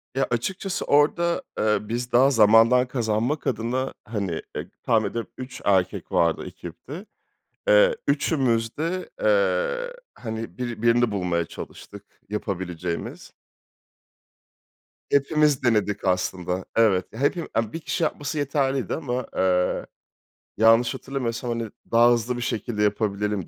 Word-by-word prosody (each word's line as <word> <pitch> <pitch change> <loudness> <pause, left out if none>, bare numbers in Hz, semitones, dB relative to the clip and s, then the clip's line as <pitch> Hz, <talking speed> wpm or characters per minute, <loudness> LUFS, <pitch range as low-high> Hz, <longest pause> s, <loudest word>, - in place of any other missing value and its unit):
Ya, 135 - +1
açıkçası 190 - -2
orada, 170 +4 +3 0.2
eee, 105 0 +3
biz 120 +3 -4
daha 125 +3 +5
zamandan 115 +2 +5
kazanmak 120 +3 -1
adına, 125 +2 -1
hani, 100 -7 -3
e - - -5
tahmin - - +2
ediyorum 115 -1 -5
3 130 0 -8
erkek 95 -3 +1
vardı 85 -1 +1
ekipte. 135 - -9 0.6
Eee, - - +6
üçümüz 130 -6 +1
de, 170 +4 -3
eee, - - +1 0.2
hani, 110 0 -6
biri 120 -3 -4
birini 120 0 +3
bulmaya 90 -4 0
çalıştık 100 +4 -10 0.2
yapabileceğimiz. 90 -4 -4 1.8
Hepimiz 145 0 +3
denedik 105 -4 +1
aslında. 90 0 -1
Evet, 100 -5 +3
ya, 110 - -8
hepi 155 +4 0
a 115 -1 -1
1 165 - -4
kişi 170 +1 -2
yapması 150 -1 -2
yeterliydi 135 -4 0
ama, 125 -5 -3
eee, 90 -1 +1 0.7
yanlış 115 +3 +5
hatırlamıyorsam, 125 -3 -4
hani, 115 -2 -3 0.2
daha 120 +1 +6
hızlı 120 +1 0
bir - - -4
şekilde 110 -2 -2
yapabilelim 105 -2 -1
120 Hz, 125 wpm, -24 LUFS, 105-140 Hz, 1.8 s, Eee